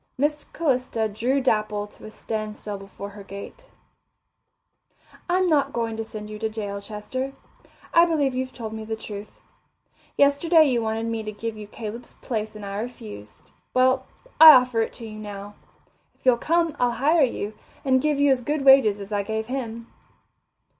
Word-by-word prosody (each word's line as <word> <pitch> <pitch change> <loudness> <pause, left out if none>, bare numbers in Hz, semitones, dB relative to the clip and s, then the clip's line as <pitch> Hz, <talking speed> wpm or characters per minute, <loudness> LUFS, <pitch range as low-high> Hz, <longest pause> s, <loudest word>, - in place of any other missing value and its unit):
Miss 295 +2 0
Calista 255 -7 0
drew 240 +6 0
Dapple 215 -4 0
to 210 - -15
a - - -7
standstill 215 -2 -5
before 195 +1 -9
her 205 0 -11
gate. 200 - -10 1.6
"I'm 370 +1 +3
not 285 -5 +2
going 230 -1 -2
to 225 - -3
send 215 -1 -8
you 215 0 -8
to 220 0 -1
jail, 205 -2 -5
Chester. 220 +6 -5 0.6
I 335 0 +7
believe 295 -6 +1
you've 255 0 -3
told 220 -4 -7
me 220 0 -5
the 220 +1 -3
truth. 210 -1 -9 0.8
Yesterday 310 +4 +5
you 250 -4 +1
wanted 225 0 -2
me 230 -1 -2
to 215 0 -5
give 220 +2 -5
you 210 -1 -9
Caleb's 220 +3 -7
place 220 -3 -4
and 210 -1 -8
I 200 0 -5
refused. 105 - -9 0.2
Well, 260 +1 +3 0.3
I 315 -1 +13
offer 250 -3 +4
it 225 - -2
to 230 - -9
you 215 -1 -8
now. 205 -1 -8 0.6
If - - -32
you'll 250 -2 +5
come, 335 +1 +1
I'll 245 -1 +2
hire 305 +7 +3
you, 225 -5 0 0.3
and 260 -1 +3
give 300 -1 +1
you 285 -1 +5
as 260 -2 +2
good 290 +2 -2
wages 265 -7 +6
as 200 +1 -9
I 205 -1 +1
gave 220 +2 -3
him." 235 -2 -5
225 Hz, 175 wpm, -24 LUFS, 215-270 Hz, 1.6 s, I